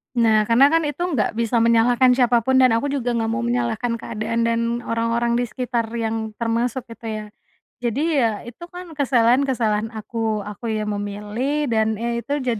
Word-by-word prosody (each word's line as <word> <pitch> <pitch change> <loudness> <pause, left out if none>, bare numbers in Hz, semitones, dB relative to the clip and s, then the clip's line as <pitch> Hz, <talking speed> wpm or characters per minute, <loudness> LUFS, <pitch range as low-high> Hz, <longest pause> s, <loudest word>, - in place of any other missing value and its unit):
Nah 220 -3 +4
karena 235 +6 +5
kan 325 +2 +2
itu 295 +1 -4
nggak 275 - 0
bisa 230 0 +2
menyalahkan 235 +2 +4
siapa 245 -2 +3
pun 260 +1 +3
dan 255 -3 +5
aku 275 +5 -1
juga 245 -4 -1
nggak 225 -1 0
mau 230 - -1
menyalahkan 235 -1 -1
keadaan 230 0 -3
dan 230 0 +1 0.2
orang-orang 235 +1 0
di 245 - -1
sekitar 240 -1 -2
yang 220 -1 -3
termasuk 235 +2 -1
itu 230 0 -9
ya. 215 -1 -4 0.5
Jadi 280 +6 0
ya 225 -4 0
itu 240 +3 -11
kan 355 -1 -10
kesalahan 255 -4 +3
kesalahan 225 -4 0
aku 220 -1 -3
aku 210 +3 -7
yang 215 -1 -2
memilih 210 +8 -2
dan, 220 -1 +1
eee, 235 +1 -2
itu 285 +1 -3
jadi 235 -4 -1
235 Hz, 180 wpm, -22 LUFS, 225-250 Hz, 0.5 s, karena